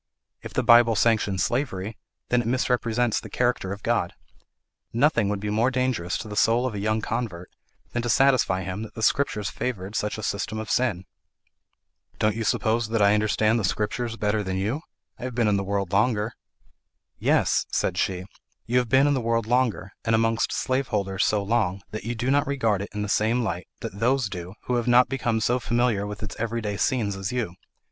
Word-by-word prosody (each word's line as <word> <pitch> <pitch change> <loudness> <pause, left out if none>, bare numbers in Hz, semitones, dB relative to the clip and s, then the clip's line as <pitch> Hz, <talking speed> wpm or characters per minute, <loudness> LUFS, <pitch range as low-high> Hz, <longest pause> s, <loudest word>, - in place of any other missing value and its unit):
If - - -9
the - - +1
Bible 120 -1 +6
sanctions 105 -4 +2
slavery, 110 -5 -2 0.3
then 125 0 +3
it 115 - -5
misrepresents 120 -2 +1
the - - -10
character 120 -6 0
of 100 0 -6
God. 115 -7 0 0.8
Nothing 120 -4 +2
would 105 -1 -1
be 105 +1 -3
more 115 +4 +2
dangerous 125 -8 -1
to - - -7
the 105 - -6
soul 115 +4 +3
of 130 - -2
a 105 - -4
young 110 +2 0
convert 110 -7 -4 0.4
than 120 - -1
to 120 - -3
satisfy 130 -9 +3
him 95 +3 -4
that 110 - -8
the 110 - -5
Scriptures 105 -6 +1
favoured 105 -4 -4
such 105 0 -1
a 110 - -6
system 100 +2 -2
of 110 0 -4
sin." 110 -8 +1 1.1
"Don't 105 -1 +1
you 115 - -2
suppose 110 +1 +1
that 115 -1 0
I 100 0 +5
understand 110 +1 +2
the - - -2
Scriptures 115 +4 -1
better 105 0 0
than 95 -2 -3
you? 110 +11 -1 0.4
I - - -8
have 125 -2 -5
been 120 -2 +2
in 105 -1 +3
the 100 - -1
world 100 -2 -2
longer." 110 +1 +2 0.9
"Yes," - - +2
said - - 0
she, 90 -1 -1 0.4
"you 125 +3 +2
have 125 -2 -2
been 135 +4 +5
in 145 - +3
the 130 - 0
world 115 -1 0
longer, 120 -5 0
and 115 0 +2
amongst 115 0 +1
slaveholders 105 -7 -1
so 105 -2 +1
long 100 -3 0
that 110 - -6
you 120 +1 -2
do 125 +3 -1
not 145 +1 +2
regard 115 -8 +1
it 100 - -5
in 105 0 -3
the - - -3
same 110 +4 +1
light 90 -5 -3
that 100 - -6
those 125 0 +2
do 90 0 -7
who 125 - 0
have 120 0 -2
not 125 +1 +5
become 120 -4 0
so 120 +3 +1
familiar 120 -4 +1
with 105 +1 -7
its 110 - -6
every 115 +1 -1
day 105 -2 -3
scenes 105 -3 0
as 95 0 -4
you. 120 -8 -2
110 Hz, 205 wpm, -25 LUFS, 100-120 Hz, 1.1 s, Bible